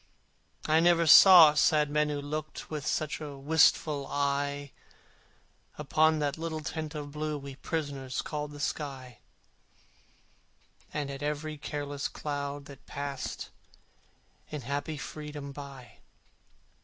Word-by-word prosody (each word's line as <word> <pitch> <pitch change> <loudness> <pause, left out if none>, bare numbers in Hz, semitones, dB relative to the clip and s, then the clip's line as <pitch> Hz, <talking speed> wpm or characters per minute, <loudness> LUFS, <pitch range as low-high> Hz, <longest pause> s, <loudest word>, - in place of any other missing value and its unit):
I 155 +1 +4
never 170 0 +4
saw 165 -1 +10
sad 150 -1 +3
men 150 0 +2
who 145 -1 -2
looked 155 +2 -6
With 150 -2 -4
such 155 0 -1
a 145 -2 -7
wistful 145 0 +3
eye 140 0 -1 1.1
Upon 155 +2 +2
that 145 0 -2
little 160 -1 -3
tent 155 +1 -5
of 145 -1 -6
blue 150 0 -3
We 140 -1 -8
prisoners 140 -5 -3
called 150 -1 -4
the 145 0 -10
sky, 135 -6 -4 1.7
And 145 -2 -3
at 135 0 -7
every 150 +1 -3
happy 145 -1 -4 0.2
cloud 145 -1 -4
that 140 -2 -14
passed 140 -1 -5 1.0
In 150 -2 -5
such 140 +4 -2
strange 155 -1 -6
freedom 150 -2 -7
by. 140 -3 -11
145 Hz, 125 wpm, -29 LUFS, 140-155 Hz, 1.7 s, saw